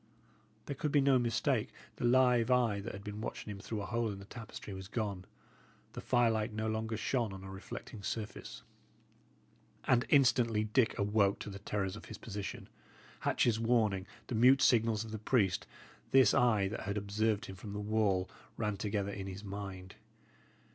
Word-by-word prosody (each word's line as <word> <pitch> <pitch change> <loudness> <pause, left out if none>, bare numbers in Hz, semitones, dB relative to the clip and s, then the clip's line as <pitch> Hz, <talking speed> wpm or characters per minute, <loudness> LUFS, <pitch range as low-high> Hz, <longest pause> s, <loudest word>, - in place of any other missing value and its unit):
There 140 - -4
could 150 +2 -2
be 145 - +4
no 135 -2 +4
mistake. 120 -1 +1 0.3
The - - -2
live 125 -1 +4
eye 120 -5 +3
that 105 +4 -5
had 100 - -8
been 105 +1 -6
watching 110 - -5
him 100 - -7
through 105 0 -4
a - - -4
hole 115 0 -1
in 100 - -6
the 100 - -10
tapestry 110 -2 -8
was 95 0 -7
gone. 100 -4 -3 0.7
The - - -6
firelight 115 -2 +2
no 110 +1 -2
longer 110 0 -2
shone 120 -2 0
on 95 0 -8
a 95 - -8
reflecting 100 +2 -8
surface. 110 +1 -5 1.2
And 125 -1 +2
instantly 120 -6 +4
Dick 110 +3 +2
awoke 100 -1 +2
to 105 - -6
the 100 - -8
terrors 100 -1 -2
of 105 - -10
his - - -8
position. 100 -3 -6 0.5
Hatch's 115 -2 +2
warning, 110 -5 +2 0.2
the - - -5
mute 125 +4 +6
signals 115 -2 +3
of 110 - -9
the 110 - -4
priest, 105 -4 +1 0.4
this 135 -1 +6
eye 120 -7 +3
that 115 - -4
had 100 +2 -2
observed 105 +2 0
him 95 - -8
from 100 +1 -8
the 105 - -3
wall, 105 -3 +1 0.3
ran 105 -2 -1
together 100 0 -2
in 100 -1 -5
his 95 +2 -7
mind. 95 -2 -7
110 Hz, 180 wpm, -33 LUFS, 100-115 Hz, 1.2 s, mute